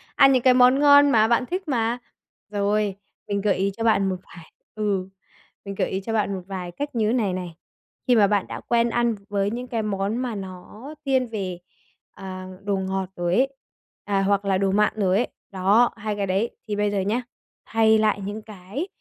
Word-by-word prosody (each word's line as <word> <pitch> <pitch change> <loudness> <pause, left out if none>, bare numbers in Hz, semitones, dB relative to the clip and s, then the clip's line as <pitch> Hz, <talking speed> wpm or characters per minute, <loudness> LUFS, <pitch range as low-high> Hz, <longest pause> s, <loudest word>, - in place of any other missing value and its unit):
Ăn 275 -1 +7
những 255 -2 +2
cái 255 -1 +6
món 250 +2 +5
ngon 285 0 +7
mà 220 -2 +5
bạn 235 +2 +2
thích 365 +2 -4
mà. 235 -3 0 0.5
Rồi, 205 -1 0 0.3
mình 200 -1 -1
gợi 200 -1 +2
ý 195 +1 0
cho 225 - -3
bạn 200 -4 +3
một 185 - -1 0.2
vài 165 -2 -14 0.2
ừ, 200 -3 -1 0.6
mình 200 - -5
gợi - - 0
ý 190 +1 -2
cho 225 +3 -4
bạn 205 -2 0
một 185 - -5
vài 185 -3 -5
cách 285 +7 -5
như 220 0 +1
này 215 -7 +1
này. 180 -2 -5 0.5
Khi 245 - +5
mà 205 -2 +5
bạn 205 -1 0
đã - - -6
quen 235 0 +1
ăn 235 -1 +1
với 200 0 0
những 245 +2 -5
cái 230 -2 -2
món 200 +2 -1
mà 250 -3 -3
nó 195 +8 -9
thiên 260 -2 +2
về, 190 -6 -4 0.5
à, 185 -1 -8 0.2
đồ 200 -1 0
ngọt 190 0 -2
rồi 175 0 0
ấy, 265 +4 +3 0.6
à, 200 -1 +1
hoặc 200 0 +1
là 195 -1 +2
đồ 195 0 +1
mặn 210 +2 +3
rồi 195 -2 +2
ấy, 245 - +1 0.2
đó, 200 +6 +3
hai 215 -1 -3
cái 200 -1 -2
đấy. 195 +6 0 0.2
Thì 210 - -2
bây 205 0 0
giờ 205 - 0
nhá, 225 +6 -1 0.4
hay 220 0 +4
lại 215 -1 +1
những 205 +3 -5
cái 210 - -6
210 Hz, 210 wpm, -24 LUFS, 195-235 Hz, 0.6 s, Ăn